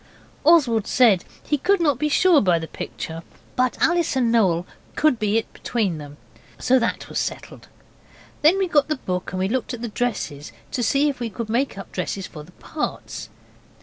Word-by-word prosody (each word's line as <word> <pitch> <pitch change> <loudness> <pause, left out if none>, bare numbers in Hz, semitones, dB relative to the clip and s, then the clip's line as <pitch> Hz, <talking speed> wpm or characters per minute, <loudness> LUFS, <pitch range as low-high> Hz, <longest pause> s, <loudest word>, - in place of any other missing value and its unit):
Oswald 270 -10 +4
said 225 -8 +4 0.2
he 295 - 0
could 395 +7 +2
not 290 -7 +2
be 300 0 +1
sure 340 +1 +5
by 180 -4 +3
the 160 0 -5
picture, 165 0 -6 0.3
but 255 -1 +1
Alice 345 -3 +2
and 245 -3 +2
Noel 180 -7 +3 0.3
could 305 -6 +3
be 210 0 +1
it 225 - -3
between 200 -9 -2
them. 145 0 -10 0.4
So 260 +1 +3
that 235 - -2
was - - -3
settled. - - -5 0.7
Then 320 +6 +5
we 385 -1 +1
got 295 -4 +3
the 305 - 0
book 185 -8 -4
and 185 +2 -1
looked 255 0 -1
at 235 - -9
the 235 - -3
dresses 185 - -3 0.2
to 250 - -2
see 275 +5 +3
if 280 -3 -2
we 235 -2 -2
could 225 +1 -6
make 245 +1 0
up 195 - -9
dresses 185 +1 -3
for 150 -4 -10
the 165 - -16
parts. 310 - -5
235 Hz, 190 wpm, -23 LUFS, 190-290 Hz, 0.7 s, sure